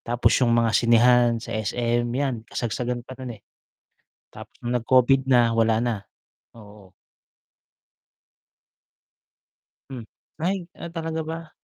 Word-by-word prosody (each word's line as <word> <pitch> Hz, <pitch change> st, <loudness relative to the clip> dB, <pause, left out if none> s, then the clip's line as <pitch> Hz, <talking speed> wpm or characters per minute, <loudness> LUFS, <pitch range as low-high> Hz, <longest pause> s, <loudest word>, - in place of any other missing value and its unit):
tapos 120 Hz, +1 st, +1 dB
'yung 120 Hz, -2 st, +3 dB
mga 115 Hz, -1 st, +2 dB
sinehan 120 Hz, +1 st, +4 dB
sa 115 Hz, -, -7 dB
SM 120 Hz, +2 st, -1 dB
'yan, 130 Hz, -5 st, -3 dB
kasagsagan 120 Hz, +1 st, -3 dB
pa 130 Hz, -, -10 dB
nun, 125 Hz, -3 st, -7 dB
eh. 100 Hz, -, -25 dB, 0.9 s
Tapos -, -, -11 dB
nung 120 Hz, +1 st, -4 dB
nag 120 Hz, -, 0 dB
Covid 130 Hz, +1 st, +4 dB
na 120 Hz, -2 st, +4 dB
wala 115 Hz, -1 st, +2 dB
na, 120 Hz, 0 st, 0 dB, 0.6 s
oo. 105 Hz, -4 st, -16 dB, 3.0 s
Hmm, 125 Hz, -4 st, -8 dB, 0.3 s
ay, 180 Hz, +1 st, -2 dB
ah, -, -, -7 dB
talaga 165 Hz, -1 st, -4 dB
ba? 165 Hz, 0 st, -7 dB
120 Hz, 125 wpm, -24 LUFS, 115-130 Hz, 3.0 s, sinehan